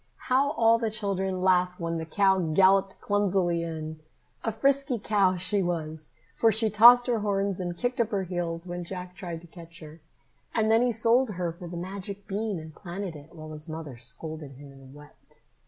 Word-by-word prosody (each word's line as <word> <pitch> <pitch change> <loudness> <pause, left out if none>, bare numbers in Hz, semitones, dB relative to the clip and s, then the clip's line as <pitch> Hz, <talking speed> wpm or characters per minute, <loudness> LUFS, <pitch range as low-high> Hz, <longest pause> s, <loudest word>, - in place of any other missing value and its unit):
How 275 +3 +3
all 230 0 +4
the 225 -1 0
children 195 -3 -2
laughed 180 -1 +2
when 165 -1 -2
the 160 - -6
cow 190 +2 +3
galloped 190 +3 +3
clumsily 190 -4 +1
in! 160 -1 -5 0.4
A 225 - 0
frisky 275 +3 +1
cow 200 -3 +2
she 185 +3 +1
was, 160 -3 -4 0.3
for 225 - +4
she 220 +1 +1
tossed 240 +3 +8
her 240 -3 0
horns 200 -2 -1
and 175 -1 -4
kicked 245 +1 -1
up 225 - 0
her 200 -4 -1
heels 175 -2 -3
when 175 0 -5
Jack 180 0 -7
tried 175 -3 -7
to - - -15
catch 170 -1 -13
her. 155 0 -12 0.5
And 220 -1 +2
then 225 +1 +5
he 245 0 +2
sold 230 +3 +2
her 175 -2 -2
for 175 +1 -10
the 175 0 -7
magic 195 +2 -6
bean 205 0 -2
and 160 -1 -9
planted 180 0 -6
it, 150 +3 -13
while 155 -1 -9
his 155 +1 -7
mother 155 -5 -7
scolded 140 +5 -3
him 140 +1 -13
and 135 0 -15
wept. 145 0 -15
185 Hz, 195 wpm, -27 LUFS, 165-210 Hz, 0.5 s, tossed